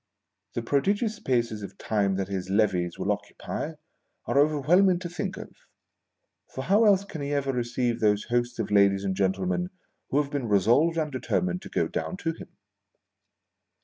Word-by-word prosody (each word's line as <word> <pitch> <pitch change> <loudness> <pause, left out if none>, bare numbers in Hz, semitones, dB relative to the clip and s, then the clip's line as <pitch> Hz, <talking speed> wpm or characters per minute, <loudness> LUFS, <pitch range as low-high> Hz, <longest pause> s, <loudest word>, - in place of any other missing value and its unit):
The 120 - -2
prodigious 205 - +1
spaces 120 - -1
of 100 - -8
time 100 -3 0
that 95 0 -2
his 95 -2 -4
levees 95 -4 +1
will - - 0
occupy, 160 - -4 0.5
are 140 - +2
overwhelming 155 +6 +4
to 175 -1 -6
think 175 -2 -4
of: - - -8 1.0
for 130 - -3
how 205 +8 +4
else 200 -2 +4
can 160 -6 -7
lie 140 - -3
ever 140 -1 0
receive 120 -1 -1
those 105 -1 +2
hosts 120 0 -1
of 110 -2 -3
ladies 100 -1 +4
and 95 -1 -1
gen 95 -1 +2
tlemen 180 - -1 0.4
who 140 - +2
have 145 -1 -1
been 140 -5 -2
resolved 120 - +3
and 155 -2 -1
deter 130 - 0
mined 185 0 -2
to - - -10
go - - 0
down 185 - -4
to 165 -4 -1
him 165 - -11
130 Hz, 180 wpm, -27 LUFS, 105-170 Hz, 1.0 s, overwhelming